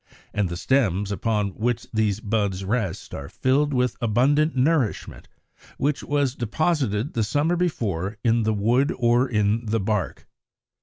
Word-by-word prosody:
And 105 -3 0
the 85 - -4
stems 105 -5 +1
upon 105 0 0
which 115 +4 -2
these 110 -1 0
buds 100 -3 -1
rest 110 -4 -2
are 70 0 -6
filled 145 +3 +1
with 125 -3 0
abundant 135 +8 +2
nourishment, 130 -3 0 0.5
which 145 +1 0
was 145 -3 0
deposited 130 - -1
the 115 - 0
summer 145 +10 +1
before 105 - -2
in 115 0 +3
the 110 0 +1
wood 120 - +2
or 120 +1 +2
in 110 0 0
the 110 +1 +1
bark. 105 0 -2
115 Hz, 145 wpm, -24 LUFS, 105-135 Hz, 0.5 s, in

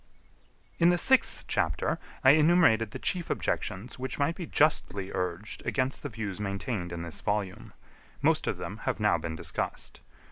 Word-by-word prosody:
In 170 0 +6
the 175 - +4
sixth 265 +8 +2
chapter 80 -7 0 0.2
I 130 - +9
enumerated 155 -8 +5
the - - -6
chief 180 -3 -1
objections 100 +8 -2
which 130 +1 -3
might 145 +3 +1
be 170 -1 -7
justly 100 -10 +1
urged 90 +4 -3
against 130 -1 -1
the 145 - -4
views 105 -4 -5
maintained 100 -2 -3
in 85 -1 -4
this 85 -1 -6
volume. 100 -3 -2 0.5
Most - - +2
of - - 0
them - - -6
have - - -1
now - - +3
been 80 0 -4
discussed. - - -4
110 Hz, 165 wpm, -29 LUFS, 95-150 Hz, 0.5 s, I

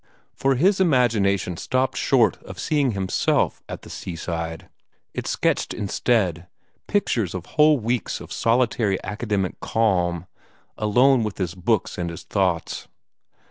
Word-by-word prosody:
For 135 0 +1
his 190 +9 +3
imagination 110 - +2
stopped 130 +5 0
short 115 -8 +2
of - - -10
seeing 145 -6 +1
himself 95 -2 0
at - - -7
the - - -11
seaside. 85 -2 -5 0.5
It - - -4
sketched - - 0
instead 95 -4 0 0.4
pictures 115 - 0
of 90 - -5
whole 150 -1 +4
weeks 120 0 -2
of - - -9
solitary 115 -4 +1
academic 105 -2 -2
calm, 90 -6 0 0.5
alone 125 +5 +4
with 105 -2 -3
his 90 -3 -2
books 95 +1 -1
and 85 -1 -2
his 85 - -8
thoughts. 90 -5 -1
105 Hz, 130 wpm, -23 LUFS, 90-125 Hz, 0.5 s, whole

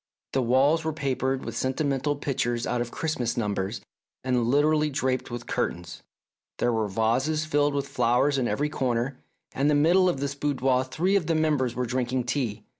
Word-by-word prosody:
The 135 - +2
walls 135 +7 +3
were 160 0 -1
papered 135 -2 -1
with - - -5
sentimental 140 +1 0
pictures 120 -4 -1
out 125 - -1
of 120 - -3
Christmas 125 -5 -2
numbers 105 -1 -2 0.4
and 125 -2 +1
literally 150 +2 +3
draped 130 -2 -1
with 120 -1 -6
curtains; 85 -2 -3 0.6
there 120 - +1
were 110 -2 0
vases 125 +10 0
filled 145 -2 +1
with 140 -1 -1
flowers 135 +2 +2
in 125 - 0
every 145 +4 0
corner, 130 -2 -1 0.3
and 140 +2 +1
in 150 - +3
the - - +3
middle 180 +4 +4
of 170 - -2
this 140 0 -2
boudoir 135 -3 +1
three 175 +9 0
of 180 -6 +1
the 165 - +1
members 145 -6 +1
were 125 +1 -1
drink 125 0 -2
ing 130 -1 0
tea. 120 -5 -2
130 Hz, 190 wpm, -26 LUFS, 120-145 Hz, 0.6 s, middle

